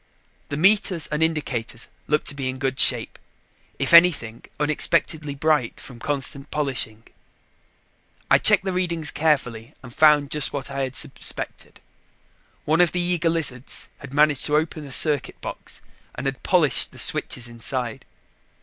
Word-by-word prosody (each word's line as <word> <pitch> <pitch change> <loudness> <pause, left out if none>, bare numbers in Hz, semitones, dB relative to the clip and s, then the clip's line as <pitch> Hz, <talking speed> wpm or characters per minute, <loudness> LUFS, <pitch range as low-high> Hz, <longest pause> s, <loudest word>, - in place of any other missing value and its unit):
The 140 - -4
meters 190 -1 +3
and 150 +1 -4
indicators 135 -8 -2 0.2
looked 150 +1 +1
to - - -1
be 135 -2 -4
in 130 - -5
good 135 0 -3
shape; - - +4 0.6
if - - -1
anything, 165 -10 +4 0.2
unexpectedly 150 0 0
bright 150 -4 0
from 125 -3 -12
constant 140 +1 -3
polishing. 130 -7 -2 1.2
I - - +4
checked - - +5
the 190 - -1
readings 170 -4 -1
carefully 130 -7 -1
and 120 -2 -12
found 150 -1 +3
just 150 -2 +1
what 140 -1 -5
I 140 0 -4
had 130 -1 -4
suspected. - - -4 0.8
One 160 +3 +2
of 175 - +2
the 180 - -1
eager 175 -2 +1
lizards 145 -6 -2
had 140 - -11
managed 145 -1 +2
to 150 - 0
open 155 -1 -3
a - - -11
circuit 145 0 +2
box - - -8 0.3
and - - -6
had 135 -1 -3
polished 160 -8 +3
the - - -15
switches 120 -1 0
inside. 120 0 -4
145 Hz, 150 wpm, -22 LUFS, 130-160 Hz, 1.2 s, checked